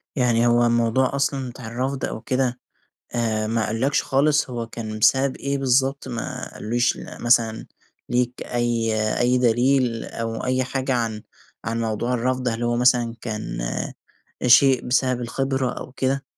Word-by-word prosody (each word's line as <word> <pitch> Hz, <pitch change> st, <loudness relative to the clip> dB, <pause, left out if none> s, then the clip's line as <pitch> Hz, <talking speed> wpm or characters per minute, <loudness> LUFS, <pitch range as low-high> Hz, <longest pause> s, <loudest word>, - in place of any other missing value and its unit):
يعني 120 Hz, -3 st, +2 dB
هو 120 Hz, 0 st, +4 dB
الموضوع 120 Hz, +3 st, +2 dB
أصلًا 140 Hz, -2 st, -1 dB
بتاع 120 Hz, -1 st, -9 dB
الرّفض 130 Hz, +4 st, -2 dB
أو 110 Hz, -, -5 dB
كده، 125 Hz, 0 st, -1 dB, 0.6 s
آآ 110 Hz, -2 st, 0 dB
ما 110 Hz, 0 st, 0 dB
قالوا 110 Hz, +1 st, -3 dB
لكش 145 Hz, -, +1 dB
خالص 145 Hz, +1 st, +2 dB
هو 120 Hz, -2 st, -4 dB
كان 110 Hz, -2 st, -6 dB
بسبب 135 Hz, +4 st, +3 dB
إيه 140 Hz, 0 st, -2 dB
بالضبط؟ 135 Hz, +1 st, +1 dB
ما 115 Hz, -2 st, -5 dB
قالوش 120 Hz, +2 st, 0 dB
ل -, -, -9 dB
مثلًا 115 Hz, -2 st, +2 dB, 0.4 s
ليك 125 Hz, 0 st, 0 dB
أي 120 Hz, -2 st, 0 dB, 0.3 s
أي 125 Hz, +1 st, +3 dB
دليل، 125 Hz, 0 st, +2 dB
أو 115 Hz, 0 st, -4 dB
أي 130 Hz, 0 st, +1 dB
حاجة 130 Hz, +1 st, -2 dB
عن 115 Hz, -3 st, -2 dB, 0.4 s
عن 115 Hz, +1 st, -2 dB
موضوع 115 Hz, +2 st, -1 dB
الرّفض، 125 Hz, +1 st, 0 dB
هل 115 Hz, 0 st, -3 dB
هو 120 Hz, 0 st, +1 dB
مثلًا 120 Hz, -1 st, +3 dB
كان 110 Hz, -, -5 dB, 0.9 s
شيء 130 Hz, +1 st, +5 dB
بسبب 125 Hz, 0 st, +1 dB
الخِبرة 130 Hz, +2 st, -1 dB
أو 125 Hz, -, -8 dB
كده؟ 135 Hz, +1 st, -1 dB
120 Hz, 155 wpm, -23 LUFS, 115-130 Hz, 0.9 s, شيء